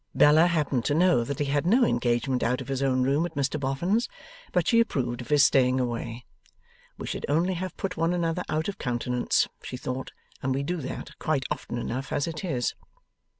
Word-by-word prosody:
Bella 155 +3 +6
happened 150 -7 0
to 145 - +1
know 175 -7 +4
that 140 +3 -4
he 145 - 0
had 145 +3 0
no 240 +6 +5
engagement 120 - +1
out 125 +2 +1
of 130 0 -7
his 135 0 -1
own 130 -2 +2
room 140 +5 +2
at 170 -2 -4
Mr 140 +2 0
Boffin's, 170 - 0 0.4
but - - +1
she 230 - +5
approved 125 - 0
of 120 - -9
his 145 -1 +6
staying 130 -1 +3
away. 120 -1 -3 0.7
'We - - -6
should - - -4
only 170 +6 +2
have 185 +1 -5
put 185 -2 -3
one 165 +1 +2
another 175 0 0
out 155 +1 0
of 200 -1 -5
countenance,' 125 0 0
she 125 - -6
thought, 130 +1 -5 0.3
'and 130 0 0
we 140 - -1
do 180 +5 -2
that 135 -5 -6
quite 140 -4 0
often 120 - -3
enough 130 +3 -4
as 145 - 0
it 160 +1 -5
is. 125 - -1
140 Hz, 205 wpm, -27 LUFS, 125-165 Hz, 0.7 s, Bella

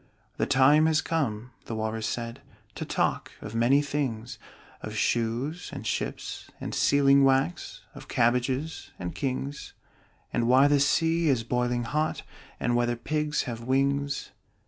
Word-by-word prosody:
"The - - 0
time 145 +4 +5
has 160 -1 +3
come," 125 -9 -2
the 115 - -5
Walrus 110 0 -2
said, 115 -1 -4 0.3
"To - - -5
talk - - -1
of 105 - -8
many 125 +5 +3
things: 130 -6 -3 0.4
Of - - -6
shoes 120 +9 -1
and - - -7
ships - - -4
and - - -5
sealing 140 -1 +4
wax 135 -9 +1
Of - - -11
cabbages 130 +6 0
and 90 -1 -5
kings 135 +1 -4 0.6
And 120 -1 +1
why 130 +3 +6
the 145 0 +3
sea 165 +3 +2
is 125 -4 +2
boiling 120 +1 0
hot 150 +6 -1 0.4
And 120 0 +1
whether 120 0 +1
pigs 150 +4 -1
have 115 -3 -5
wings." 140 +3 0
130 Hz, 145 wpm, -27 LUFS, 120-145 Hz, 0.6 s, why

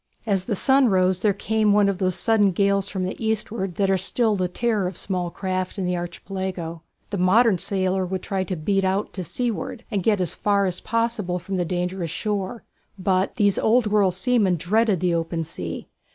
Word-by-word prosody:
As 195 -4 0
the 215 - -1
sun 265 +4 +4
rose 185 -1 +2
there 210 +2 +3
came 215 +1 +1
one 205 -1 +4
of 195 -2 -1
those 185 -2 +1
sudden 205 -4 +3
gales 200 +1 +2
from 190 -2 -3
the 185 +5 -4
eastward 215 -4 -2
that 195 -1 +1
are 190 - +2
still 220 +3 +2
the 185 -2 0
terror 210 0 0
of 180 - -6
small 180 -3 -2
craft 185 +1 -3
in 190 - -2
the 180 0 0
Archipelago. 175 -1 -5 0.3
A 200 - -2
modern 190 +2 +4
sailor 190 0 0
would 185 0 -4
try 195 -1 -1
to 185 - -3
beat 195 +5 0
out 190 +2 -1
to 185 - -4
seaward 220 +4 -3
and 200 -3 0
get 205 +1 +2
as 180 -3 0
far 200 -1 +1
as 180 -1 -2
possible 230 -6 -1
from 190 +2 -4
the 175 - 0
dangerous 180 0 -2
shore, 205 +5 -3 0.3
but 190 0 0
these 205 -3 +2
old 235 +2 +3
world 205 -3 +2
seamen 195 -1 +2
dreaded 205 +2 +1
the 180 -1 +1
open 165 0 -1
sea. 90 - -6
190 Hz, 200 wpm, -23 LUFS, 180-210 Hz, 0.3 s, sun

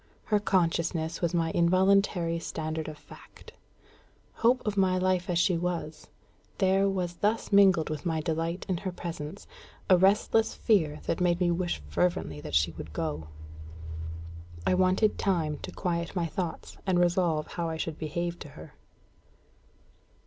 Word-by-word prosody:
Her 210 -1 +2
consciousness 170 -4 0
was 170 -2 +1
my 165 -2 0
involuntary 180 -1 +3
standard 160 -1 -4
of 155 -1 -7
fact. - - -15 0.9
Hope 245 +2 +3
of 210 -2 -1
my 190 -2 +3
life 185 0 +1
as 175 - +1
she 175 0 +2
was, 165 -3 -4 0.5
there 195 0 +3
was 180 -3 -2
thus 215 +2 0
mingled 190 -6 +5
with 155 -2 -4
my 165 -3 0
delight 165 +2 -2
in 185 -3 0
her 190 +1 -4
presence 170 0 -7 0.5
a 185 - +8
restless 210 +3 +3
fear 160 -9 +1
that 175 - -1
made 175 -1 +2
me 175 -1 +2
wish 175 0 -2
fervently 80 - -1
that 75 - -4
she 75 0 +3
would - - -9
go. 75 +1 -3 1.4
I - - +3
wanted 185 +3 +2
time 160 -6 0
to - - -7
quiet 170 -2 -2
my 175 -2 0
thoughts 170 +1 -5
and 185 -2 +3
resolve 175 -3 +2
how 170 -1 -3
I 160 - -3
should 160 -1 -4
behave 170 +2 -3
to 145 - -9
her. - - -11
175 Hz, 155 wpm, -28 LUFS, 160-185 Hz, 1.4 s, a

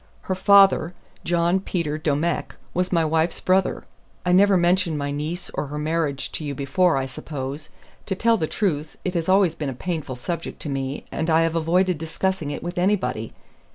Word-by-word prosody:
"Her 190 - -2
father, 190 -3 +5 0.3
John 175 +2 +2
Peter 170 -5 -2
Domecq, 155 +2 -1 0.2
was 180 +1 0
my 165 -3 +3
wife's 160 +2 +1
brother. 185 +1 +1 0.4
I 180 - +2
never 195 +1 +5
mentioned 175 -2 +2
my 140 0 -2
niece 155 +5 -4
or 150 - -3
her 150 +2 -5
marriage 150 -2 -1
to - - -5
you 145 -1 -3
before, 140 +4 +2
I 135 - 0
suppose. 135 +2 -6 0.4
To 190 - -1
tell 230 +4 +3
the 155 - -1
truth, 155 -7 -2
it 185 - -1
has 170 -1 -1
always 190 -3 +4
been 155 -4 -4
a - - -4
painful 155 -2 -4
subject 165 +7 -5
to 150 - -5
me, 135 0 -3
and 160 +1 -2
I 160 0 +4
have 165 0 +1
avoided 175 +1 +2
discussing 165 0 -2
it 145 - -5
with 175 +1 -3
anybody. 125 - 0
165 Hz, 190 wpm, -23 LUFS, 150-185 Hz, 0.4 s, father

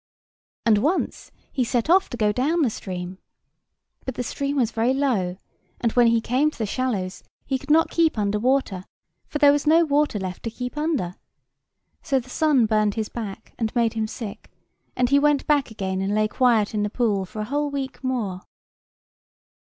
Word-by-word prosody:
And 215 -3 +5
once 305 - -1 0.2
he 260 - 0
set 240 +1 0
off 370 +3 +4
to 245 - -6
go 210 -2 +2
down 300 +9 +1
the 245 - +1
stream. 185 -2 -6 0.8
But 260 - -5
the 250 - -2
stream 280 +4 -3
was 240 -5 +1
very 235 +4 +1
low; 210 -11 0 0.4
and 230 - +1
when 240 0 +4
he 230 0 +4
came 260 +7 +2
to - - -14
the 220 - -1
shallows 205 -5 -2 0.2
he 265 -1 -1
could 280 - -14
not 320 +2 +4
keep 330 -6 +2
under 210 0 0
water, 240 -6 0 0.4
for - - -3
there 290 -1 +6
was 290 0 0
no 330 +2 +6
water 290 -5 +1
left 185 -2 -5
to 230 - -3
keep 250 +3 -6
under. 295 - -1 0.9
So 270 -1 +1
the 250 0 -11
sun 290 -6 +3
burned 215 -2 +1
his 220 -1 -2
back 220 -2 -7
and 225 0 -2
made 230 -2 +2
him 220 -1 -1
sick; 215 -2 -8 0.5
and 250 -1 +1
he 280 - +6
went 295 -1 +2
back 290 -3 +2
again 190 -3 -3
and 195 +2 0
lay 215 0 +2
quiet 225 -3 +2
in 210 - 0
the 210 - 0
pool 210 -4 0
for 190 +3 -8
a - - -1
whole 290 +5 -1
week 275 -1 -5
more. 220 -8 -2
240 Hz, 195 wpm, -24 LUFS, 210-280 Hz, 0.9 s, there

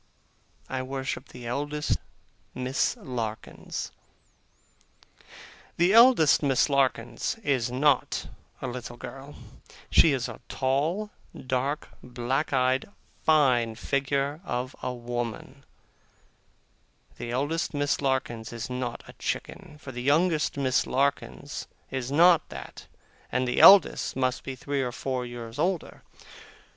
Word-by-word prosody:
I 130 -1 -3
worship 130 0 -4
the 125 -1 -10
eldest 145 +5 -1 0.6
Miss 130 +1 0
Larkins. 115 -4 -5 1.9
The 175 +3 +4
eldest 230 - +7
Miss 140 0 +2
Larkins 130 - 0
is 130 -4 +1
not 135 +2 +1 0.4
a - - -1
little 120 -1 -6
girl. 135 +3 -9 0.6
She 160 - +6
is 130 -3 -1
a - - -9
tall, 155 +11 0 0.3
dark, 130 +3 -2
black 125 +4 -2
eyed, 130 +2 +1 0.4
fine 125 -8 +4
figure 140 +4 -1
of 125 -5 -3
a - - -2
woman. 120 +2 -5 1.5
The 120 - -6
eldest 145 +6 -1
Miss 145 0 0
Larkins 130 -5 -1
is 120 +1 -6
not 125 -1 -4
a - - -11
chicken; 150 - -5
for 135 - -8
the 125 -1 -6
youngest 155 +3 +2
Miss 130 -2 +1
Larkins 140 +2 -1 0.2
is 130 -1 -3
not 170 +3 +5
that, - - -9 0.4
and 125 +1 0
the 125 - 0
eldest 195 -4 +7
must 130 0 0
be 135 - -5
three 140 +2 -2
or 125 -2 -2
four 125 0 -3
years 120 0 -8
older. 175 +1 -1
130 Hz, 120 wpm, -27 LUFS, 125-145 Hz, 1.9 s, eldest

